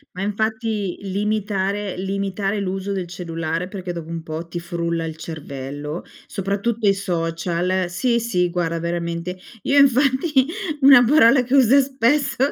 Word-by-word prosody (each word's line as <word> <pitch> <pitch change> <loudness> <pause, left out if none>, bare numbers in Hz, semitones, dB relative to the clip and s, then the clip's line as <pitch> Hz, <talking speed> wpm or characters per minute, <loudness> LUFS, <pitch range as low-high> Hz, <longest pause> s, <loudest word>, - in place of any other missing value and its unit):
Ma 185 - -5
infatti, 215 -1 -1
limitare 200 0 -2
limitare 195 +1 -2
l'uso 195 +1 -3
del 190 -2 -2
cellulare, 165 -1 -4
perché 185 -2 -6
dopo 170 -2 -6
un 165 -1 -5
po' 160 +1 -6
ti 170 +1 -5
frulla 170 -1 -2
il 160 -1 -5
cervello, 145 -1 -6 0.2
soprattutto 200 +3 -1
i 195 - +6
social 175 0 -1
sì, 235 +7 +1
sì 180 -6 +1
guarda 170 -1 -1
veramente, 170 +1 -3 0.3
io 280 - +2
infatti 270 +1 +4 0.4
una 270 -3 +9
parola 250 -1 +5
che 250 +2 -4
uso 270 0 +6
spesso 270 +1 +1
190 Hz, 140 wpm, -21 LUFS, 170-225 Hz, 0.4 s, una